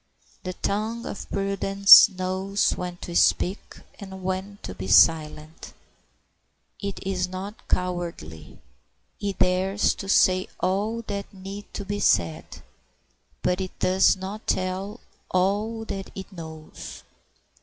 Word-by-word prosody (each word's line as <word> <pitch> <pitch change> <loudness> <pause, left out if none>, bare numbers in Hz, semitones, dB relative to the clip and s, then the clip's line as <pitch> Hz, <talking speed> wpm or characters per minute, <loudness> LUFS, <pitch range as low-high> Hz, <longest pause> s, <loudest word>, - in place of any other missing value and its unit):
The 185 - -5
tongue 215 +5 -3
of - - -7
prudence 195 0 +7
knows 190 +1 -1
when 180 -1 -5
to 170 - -7
speak 185 +3 +1 0.2
and 190 -2 -9
when 190 +2 -3
to 95 - -6
be 95 +1 -7
silent. 155 - +2 1.0
It 200 -1 -5
is 185 -2 -1
not 195 +3 -8
cowardly; 170 - -3 0.6
it 200 -2 -3
dares 190 +3 +2
to 195 - -8
say 185 -1 +4
all 210 +5 -1
that 200 -2 -5
need 195 +1 -9 0.2
be 205 0 -2
said, 85 - 0 0.8
but 180 +1 +1
it 185 - -6
does 190 +1 +3
not 195 +3 -7
tell 190 +4 -2 0.3
all 205 +5 0
that 195 -2 -6
it 190 +1 -8
knows. 160 -3 -10
190 Hz, 120 wpm, -25 LUFS, 180-200 Hz, 1.0 s, prudence